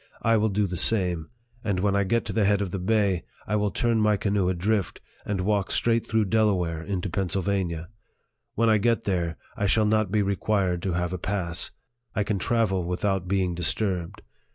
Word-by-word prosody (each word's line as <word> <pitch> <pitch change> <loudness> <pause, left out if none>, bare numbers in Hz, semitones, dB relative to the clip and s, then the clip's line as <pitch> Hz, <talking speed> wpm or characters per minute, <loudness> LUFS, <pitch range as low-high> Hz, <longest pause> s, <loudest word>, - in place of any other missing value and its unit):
I 115 0 +4
will 110 0 +2
do 105 +1 +1
the 90 -2 -4
same; 90 -7 +1 0.3
and 100 -5 0
when 100 +1 +1
I 100 0 +2
get 115 +5 +1
to 105 - -4
the 110 - +2
head 100 0 +3
of 100 -3 -2
the 95 - -3
bay, 100 -2 +1 0.2
I 105 - -1
will 105 -1 +1
turn 115 +1 +1
my 105 -1 +3
canoe 100 -2 +1
adrift, 95 +2 0 0.3
and 100 -3 -1
walk 100 0 +1
straight 115 -1 +1
through 110 -1 +2
Delaware 95 -6 +1
into 95 +2 -3
Pennsylvania. 95 -2 -1 0.7
When 115 +1 +2
1 110 -2 +4
get 115 +1 +2
there, 85 -4 -1 0.2
I 100 - 0
shall 110 +2 +3
not 110 -2 +2
be 105 -1 +2
required 95 -2 0
to 95 -1 -1
have 90 +1 -1
a 90 - -3
pass; 90 -2 -3 0.5
I 105 - +2
can 100 -1 -1
travel 100 -3 +1
without 90 +1 -1
being 95 -1 +1
disturbed. 90 0 -2
100 Hz, 195 wpm, -26 LUFS, 90-105 Hz, 0.7 s, I